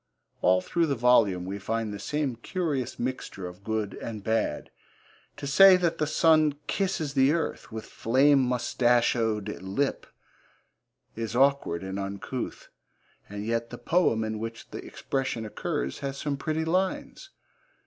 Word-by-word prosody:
All 90 0 +4
through 165 - 0
the 140 - 0
volume 115 -7 +3
we 100 +2 -4
find 110 +1 -2
the 100 - -6
same 145 -1 -2
curious 140 0 -3
mixture 125 -6 -4
of 90 +2 -9
good 110 -1 -2
and 110 -3 -7
bad. 110 0 -1 0.7
To - - -6
say 185 +7 +8
that 170 -2 0
the 150 - +1
sun 155 -1 +4
kisses 180 -7 -1
the 135 +1 +4
earth 165 -6 -3
'with 110 0 -6
flame 135 +5 +3
moustachoed 120 -4 +1
lip' 100 +10 -2 1.1
is 115 0 -4
awkward 135 -10 +2
and 95 +1 -4
uncouth, 100 +6 -5 0.6
and 105 +1 -5
yet 115 +1 -1
the 120 - -8
poem 120 -4 +2
in 110 0 -3
which 115 +1 -7
the - - -6
expression 130 -4 -3
occurs 85 -9 -3
has 140 -1 -4
some 145 0 -2
pretty 155 +3 -2
lines. 185 - -1
120 Hz, 145 wpm, -27 LUFS, 110-145 Hz, 1.1 s, say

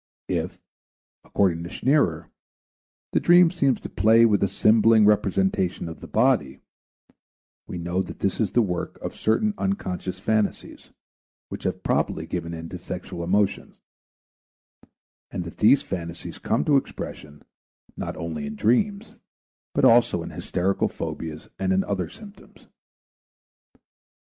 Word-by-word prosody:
If, - - -2 0.7
according 85 -4 +1
to 85 - -6
Scherner, 90 - +1 0.8
the - - +2
dream 175 -1 +6
seems 140 -9 +1
to - - -6
play 115 +2 +4
with 105 -3 +3
a 100 - +3
symboling 110 +1 +4
representation 95 -3 +1
of 80 - -8
the - - -10
body, 110 - +1 1.1
we - - -6
know 85 +2 -1
that 95 - -7
this 95 - -1
is 110 -5 0
the 120 - +4
work 90 -4 -3
of - - -6
certain 205 - +1
unconscious 95 - -3
phantasies 110 +1 -2 0.6
which - - -7
have - - -2
probably - - 0
given 85 -1 -4
in 85 0 -6
to 90 - -7
sexual 90 0 -6
emotions, 100 +3 0 1.5
and 90 - -4
that 85 - -10
these 120 +6 +5
phantasies 85 -2 -6
come - - 0
to 145 -2 +4
expression 75 - -6 0.5
not - - -5
only 80 -3 -4
in 110 - -6
dreams 200 - +1 0.6
but - - +3
also 115 -7 +4
in - - -7
hysterical 95 +2 -1
phobias 80 -1 -6
and 95 -1 0
in 95 +1 +2
other 95 -5 -2
symptoms. 205 - -15
95 Hz, 135 wpm, -24 LUFS, 85-115 Hz, 1.5 s, dream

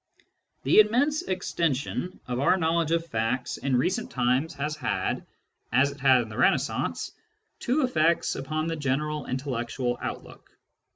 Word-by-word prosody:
The - - +5
immense 265 +9 +4
extension 180 - -2
of 125 0 -2
our 140 +7 +4
knowledge 165 -2 +1
of 165 0 +1
facts 120 -2 -2
in 135 -2 0
recent 180 - 0
times 130 +5 0
has 150 +2 -2
had, - - -2 0.4
as 130 +4 +3
it 140 - -12
had 130 -2 +5
in 110 - -10
the 105 - -8
Renaissance, - - +1 0.5
two 270 +5 +1
effects 170 -9 +2
upon 155 +3 -2
the 165 0 -2
general 150 0 -2
intellectual 125 -1 -2
outlook. - - -8
150 Hz, 140 wpm, -27 LUFS, 130-170 Hz, 0.5 s, The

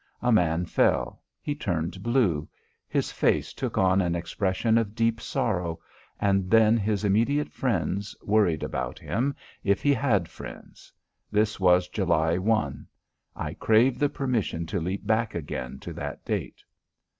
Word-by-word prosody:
A 125 - +3
man 90 -5 +3
fell; - - +1 0.2
he 145 - -1
turned 90 - -3
blue; 115 - +1 0.4
his - - -1
face - - +1
took - - -4
on 95 0 +4
an 85 -2 0
expression 95 +6 +1
of 110 -2 -3
deep 115 0 +1
sorrow; 85 -7 -1 0.4
and 95 -2 +1
then 110 0 +5
his 105 -2 0
immediate 115 +9 +2
friends 100 -4 -1
worried 100 -7 +2
about 60 -1 -3
him, 130 +6 -1 0.3
if 100 0 +1
he 145 - +4
had 110 -9 +1
friends. - - -11 0.4
This 105 0 +1
was 90 -1 +4
July 85 -3 +1
1. 110 +3 0 0.5
I - - -4
crave 115 +4 +3
the 145 - +3
permission 120 - -1
to 80 - -2
leap 95 +4 -3
back 110 -1 +1
again 65 -5 -5
to - - -7
that 70 0 -6
date. - - -3
100 Hz, 145 wpm, -26 LUFS, 90-115 Hz, 0.5 s, then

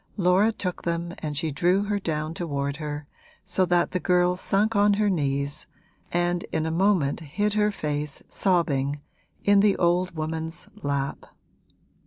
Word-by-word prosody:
Laura 190 +3 +4
took 185 -5 -4
them 170 0 -2
and 150 -2 -3
she 160 +1 -1
drew 180 +7 +2
her 205 0 -1
down 155 -3 -2
toward 140 -4 -3
her, 150 -1 -5 0.4
so 185 0 +1
that 175 0 +2
the 185 - -1
girl 180 0 +3
sunk 205 +4 +1
on 205 0 +4
her 210 0 +2
knees 140 -2 -1 0.4
and 175 0 0
in 160 0 0
a 160 - -1
moment 175 -5 +2
hid 205 +7 -1
her 210 0 +3
face, 150 -6 -3
sobbing, 145 -7 +1 0.4
in 205 0 +5
the 200 -1 +4
old 175 0 +1
woman's 160 +1 -4
lap. 140 -1 -2
175 Hz, 155 wpm, -25 LUFS, 150-190 Hz, 0.4 s, in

